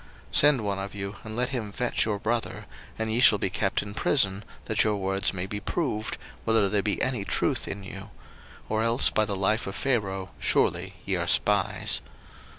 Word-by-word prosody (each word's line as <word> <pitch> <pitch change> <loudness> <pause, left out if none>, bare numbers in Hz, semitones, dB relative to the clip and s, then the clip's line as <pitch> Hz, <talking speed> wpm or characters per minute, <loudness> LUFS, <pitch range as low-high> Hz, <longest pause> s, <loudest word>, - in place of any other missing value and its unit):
01:042:016 - - -6
Send 145 -4 +5
one 100 -2 -2
of 100 +1 -6
you, 100 0 -5
and 110 -1 -7
let 125 +1 0
him 115 -6 -4
fetch 125 +4 0
your 105 -2 -1
brother, 115 +3 -2 0.3
and 110 0 -2
ye 115 - +1
shall 110 -4 +7
be 95 - -2
kept 100 0 0
in 100 0 -8
prison, 105 -3 +1 0.2
that 110 - +2
your 105 -1 +1
words 95 0 +1
may 95 -1 -4
be 105 +2 -5
proved, 110 -2 -3 0.3
whether 110 -3 +3
there 100 0 +2
be 105 0 -1
any 125 -6 -1
truth - - 0
in 100 0 -5
you: 95 0 -9 0.6
or 110 0 0
else 115 +2 +3
by 110 - +2
the 105 -2 -2
life 105 +4 0
of 95 - -5
Pharaoh 95 -8 -1
surely 95 +2 +1
ye 95 - 0
are 85 -1 -2
spies. 100 0 +2
105 Hz, 200 wpm, -26 LUFS, 95-110 Hz, 0.6 s, shall